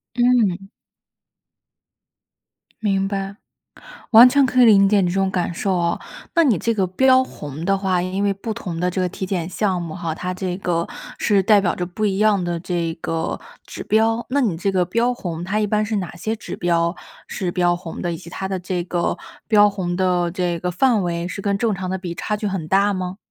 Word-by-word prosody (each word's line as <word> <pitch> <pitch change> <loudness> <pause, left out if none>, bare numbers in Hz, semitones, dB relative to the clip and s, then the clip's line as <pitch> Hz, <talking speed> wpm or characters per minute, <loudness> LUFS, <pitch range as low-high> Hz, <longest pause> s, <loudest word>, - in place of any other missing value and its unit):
嗯。 230 -7 +2 2.1
明 195 -2 0
白。 195 0 -4 0.8
完 230 +2 +10
全 280 +1 +4
可 255 -1 +3
以 - - +8
理 200 -4 +6
解 205 -1 +4
你 180 - +1
这 175 - -2
种 195 0 +1
感 180 -2 -1
受 190 +2 -1
啊。 170 -1 0 0.4
那 335 - +5
你 245 -9 +3
这 230 +7 0
个 195 -4 0
标 260 +7 +4
红 150 - -8
的 195 +2 +2
话， 190 -2 0
因 185 +2 -2
为 200 - +2
不 215 +3 -5
同 175 -4 -5
的 180 0 +1
这 185 +1 -2
个 180 - +1
体 190 +1 -5
检 180 -3 -2
项 185 -1 -1
目 160 -2 -6
哈， 170 -3 -3
它 180 +2 -4
这 185 -1 -3
个 170 -3 -1 0.3
是 200 -2 +2
代 205 +1 +5
表 175 -4 0
着 180 - -3
不 200 +5 -2
一 195 -1 -1
样 210 -3 +3
的 175 -1 -2
这 170 -2 -2
个 165 0 -2 0.3
指 - - -7
标。 225 +2 +2
那 285 +2 +2
你 215 -11 0
这 190 +4 -1
个 185 -2 +2
标 230 +7 +1
红 175 -8 -5
它 200 +4 -1
一 210 - +1
般 210 +1 +1
是 215 0 -2
哪 180 -4 -4
些 220 +5 -2
指 - - -7
标 170 0 +1 0.3
是 185 -3 -3
标 175 -1 +2
红 175 -2 -8
的， 175 - -2
以 - - -4
及 170 0 -12
它 190 +1 -4
的 190 -1 -2
这 180 0 -3
个 175 -1 -1 0.3
标 210 -2 +6
红 185 -3 -3
的 180 -2 +1
这 175 -1 -2
个 180 +2 -2
范 225 +3 +2
围 170 -1 -2
是 195 - -6
跟 200 0 0
正 220 0 +1
常 185 -1 -4
的 190 - -2
比 175 -2 -5
差 210 +5 -2
距 210 - -4
很 190 -5 -3
大 200 +2 +3
吗？ 185 0 -4
190 Hz, 235 characters per minute, -21 LUFS, 175-210 Hz, 2.1 s, 完